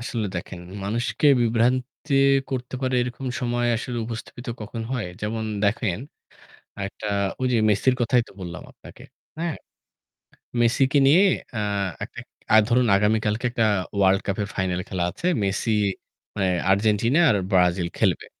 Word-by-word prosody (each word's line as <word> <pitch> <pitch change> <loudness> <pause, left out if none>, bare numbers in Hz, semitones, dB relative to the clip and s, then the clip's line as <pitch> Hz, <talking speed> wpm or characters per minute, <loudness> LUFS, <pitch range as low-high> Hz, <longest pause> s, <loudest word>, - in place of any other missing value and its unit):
আসলে 120 -3 -3
দেখেন, 85 +1 -6 0.2
মানুষকে 115 +8 0
বিভ্রান্তি 125 +5 0 0.4
করতে 125 -1 -4
পারে 130 0 0
এরকম 125 +2 -5
সময় 120 0 0
আসলে 120 +1 -4
উপস্থাপিত 115 +2 -8
কখন 110 +2 -5
হয়? 125 -6 -2
যেমন 110 +1 -2 0.2
দেখেন, 100 -3 0 0.9
একটা 105 +2 -8 0.3
ঐ - - -8
যে - - +3
মেসির 115 +5 +3
কথাই 120 +1 +3
তো - - -15
বললাম 90 -1 -7
আপনাকে। - - -15 0.3
হ্যাঁ? 165 -2 -2 1.1
মেসিকে 130 +4 +3
নিয়ে 160 +8 +6 0.3
অ্যাঁ 100 -2 -1 0.2
একটা - - -10 0.5
ধরুন 125 0 +3
আগামীকালকে 105 +2 +1
একটা 115 -1 +1 0.3
ওয়ার্ল্ড 95 -1 +4
কাপের 100 +1 -2
ফাইনাল 90 -2 -1
খেলা 90 -2 -1
আছে। 170 - -6 0.2
মেসি 100 +4 -1 0.7
অ্যাঁ 95 -3 +1
আর্জেন্টিনা 110 - +3
আর 105 - +3
ব্রাজিল 90 -2 +3
খেলবে। - - +1
115 Hz, 135 wpm, -24 LUFS, 100-125 Hz, 1.1 s, নিয়ে